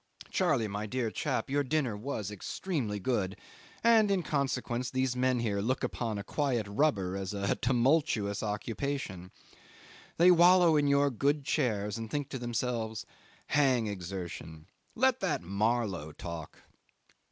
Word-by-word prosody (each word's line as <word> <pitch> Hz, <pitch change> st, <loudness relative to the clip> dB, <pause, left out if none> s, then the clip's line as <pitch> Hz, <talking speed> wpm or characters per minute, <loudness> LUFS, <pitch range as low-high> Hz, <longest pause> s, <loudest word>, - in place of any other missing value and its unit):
Charley, 110 Hz, -, +2 dB
my 105 Hz, +1 st, -4 dB
dear 120 Hz, -1 st, -2 dB
chap, 135 Hz, 0 st, -2 dB
your 145 Hz, +1 st, +1 dB
dinner 130 Hz, -5 st, 0 dB
was 105 Hz, -3 st, -4 dB
extremely 110 Hz, -, -3 dB
good, 95 Hz, -3 st, -1 dB, 0.5 s
and 225 Hz, -3 st, +5 dB
in 195 Hz, -3 st, +1 dB
consequence 130 Hz, -4 st, -1 dB
these 130 Hz, -1 st, 0 dB
men 125 Hz, -1 st, +1 dB
here 105 Hz, -4 st, 0 dB
look 130 Hz, +5 st, -1 dB
upon 115 Hz, -3 st, -2 dB
a 100 Hz, -, -4 dB
quiet 125 Hz, -2 st, -1 dB
rubber 100 Hz, -5 st, +1 dB
as 95 Hz, +1 st, -4 dB
a 100 Hz, -1 st, 0 dB
tumultuous 125 Hz, -5 st, +1 dB
occupation. 105 Hz, -2 st, -3 dB, 0.9 s
They 175 Hz, +2 st, +7 dB
wallow 175 Hz, -1 st, +6 dB
in 145 Hz, -1 st, +3 dB
your 140 Hz, 0 st, +3 dB
good 140 Hz, +4 st, 0 dB
chairs 110 Hz, -9 st, 0 dB
and 115 Hz, -1 st, -5 dB
think 145 Hz, +1 st, -3 dB
to 135 Hz, -, -5 dB
themselves, 120 Hz, -2 st, -2 dB, 0.4 s
"Hang 130 Hz, -6 st, +3 dB
exertion. 90 Hz, -5 st, -6 dB, 0.3 s
Let 260 Hz, +1 st, +3 dB
that 175 Hz, -, -1 dB
Marlow 100 Hz, -4 st, -1 dB
talk." 85 Hz, -2 st, -8 dB
120 Hz, 140 wpm, -30 LUFS, 100-145 Hz, 0.9 s, They